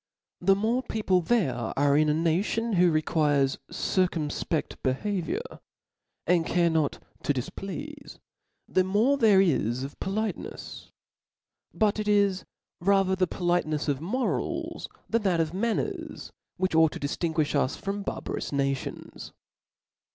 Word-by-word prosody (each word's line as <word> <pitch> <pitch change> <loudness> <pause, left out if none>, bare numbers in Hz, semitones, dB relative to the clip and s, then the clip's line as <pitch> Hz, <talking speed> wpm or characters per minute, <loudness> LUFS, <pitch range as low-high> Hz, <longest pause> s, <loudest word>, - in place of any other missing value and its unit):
The 195 +2 +4
more 225 +5 +1
people 210 -7 +1
there 185 - +2 0.2
are 140 0 +4
in 155 +1 +4
a - - +3
nayon 190 +8 0
who 180 0 +5
require 155 -3 +2
a - - +3 0.2
circumfpe^ 170 -3 -1
behaviour, 200 - -2 0.7
and 175 -2 +3
a - - -7
care 170 -1 +3
not 160 -3 +1 0.2
to 145 - +1
dif 125 -3 -4
pleafe, 285 +9 -7 0.5
the 185 - +2
more 220 +9 +2
there 210 -5 +6
is 130 - +1
of 140 - -8
politenefs. 215 +3 -4 0.8
But 215 -1 +1
it 210 - -2
is 200 -2 +2 0.3
ra 195 +2 +4
ther 190 0 0
the 185 -1 +1
politenefs 175 -4 0
of 140 -3 0
morah, 235 - -2 0.2
than 230 0 +1
that 185 -5 +1
of 160 0 0
manners, 225 +4 -2 0.3
which 185 -1 0
ought 160 -1 +5
to - - -6
diftinguiih 155 +1 -1
lis 130 - -1
from 200 +1 -4
barbarous - - -4
na 140 -1 +1
tions. 135 - -8
180 Hz, 145 wpm, -27 LUFS, 155-205 Hz, 0.8 s, there